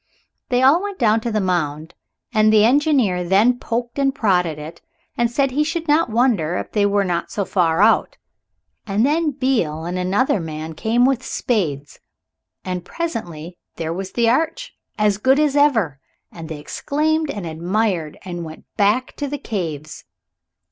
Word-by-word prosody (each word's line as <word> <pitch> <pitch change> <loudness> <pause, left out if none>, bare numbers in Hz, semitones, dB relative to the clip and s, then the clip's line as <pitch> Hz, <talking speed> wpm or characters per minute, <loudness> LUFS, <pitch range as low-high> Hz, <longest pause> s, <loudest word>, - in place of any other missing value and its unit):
Then 250 - +1
they - - +1
all 290 +7 +5
went 405 -1 -5
down 225 -2 +3
to 235 - -3
the 215 - 0
mound, 160 -5 -2 0.4
and 215 -1 +4
the 215 -1 +5
engineer 255 - +2
then 210 +8 +3
poked 235 +3 -3
and 275 -1 +1
prodded 180 - +1
it 155 +2 -9 0.3
and 235 -1 +1
said 270 +3 +1
he 295 +4 +1
should 330 +1 -3
not 300 0 +3
wonder 220 -8 +1
if - - -5
they 205 -2 +2
were 200 0 +2
not 175 -3 -2
so 200 - -2
far 175 -1 +2
out. 225 - +3 0.7
And 205 +3 +2
then 310 +3 +2
Beale 225 - -1
and 180 +1 -3
another 195 +5 +1
man 160 -1 -6
came 230 +8 +1
with 265 -2 +1
spades, 150 - -2 0.7
and 180 -1 -3
presently 175 - -5 0.2
there 165 0 -3
was 190 +2 -6
the 235 -1 +2
arch, 325 - 0 0.2
as 210 -2 +2
good 265 +6 +3
as 295 -2 +2
ever, 225 - +2 0.3
and 165 -1 -9
they 160 - -5
exclaimed 310 - -1
and 205 -9 -4
admired 170 0 -1
and 175 -2 -5
went 160 -1 -10
back 215 +5 +1
to 290 - -3
the 290 +1 -4
caves. 160 - -5
215 Hz, 170 wpm, -20 LUFS, 175-265 Hz, 0.7 s, all